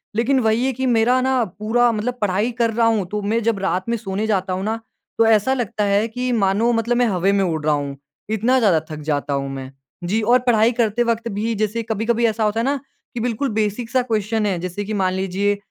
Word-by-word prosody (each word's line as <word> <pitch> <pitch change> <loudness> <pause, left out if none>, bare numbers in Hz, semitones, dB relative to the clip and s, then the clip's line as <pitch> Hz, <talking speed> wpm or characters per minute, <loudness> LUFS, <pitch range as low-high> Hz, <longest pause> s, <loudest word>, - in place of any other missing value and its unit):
लेकिन 250 +4 +2
वही 225 +1 +1
है 265 - +1
कि 260 +2 -3
मेरा 245 +1 +3
ना 260 -1 +2 0.2
पूरा 240 +3 +2
मतलब 230 +3 -3
पढ़ाई 205 +4 +1
कर 230 -1 +2
रहा 230 +1 +3
हूँ, 220 -4 +1
तो 210 +3 -3
मैं 220 +3 0
जब 225 -2 0
रात 190 +1 -1
में 235 - +1
सोने 210 0 -3
जाता 190 -3 0
हूँ 185 +1 -3
ना, 220 +2 -2 0.4
तो 225 - +4
ऐसा 225 +3 +3
लगता 235 -4 -2
है 200 +2 +2
कि 250 +2 -3
मानो 215 +1 +2
मतलब 235 +1 0
मैं 245 - +3
हवे 190 -1 +1
में 200 -1 +2
उड़ 160 -4 -2
रहा 155 - +3
हूँ, 140 -1 -4 0.3
इतना 225 +4 +2
ज़्यादा 195 -9 +4
थक 155 -1 -6
जाता 145 0 -1
हूँ 140 0 -2
मैं। 135 -1 -7 0.3
जी, 205 +6 0
और 240 +4 +4
पढ़ाई 225 -1 +4
करते 235 -1 +1
वक़्त 235 0 -1
भी 215 +3 -2
जैसे 215 +2 -1
कभी-कभी 225 +2 0
ऐसा 220 0 -1
होता 210 +1 +1
है - - 0
ना 280 +2 +1 0.4
कि 240 - -4
बिल्कुल 245 +3 -1
बेसिक 210 -1 0
क्वेस्चन 255 - +2
सा - - +3
क्वेस्चन 220 -1 0
है। 195 -3 0
जैसे 180 +3 -4
कि 215 - -4
मान 190 -3 0
लीजिए 190 +2 0
220 Hz, 240 wpm, -21 LUFS, 195-235 Hz, 0.4 s, तो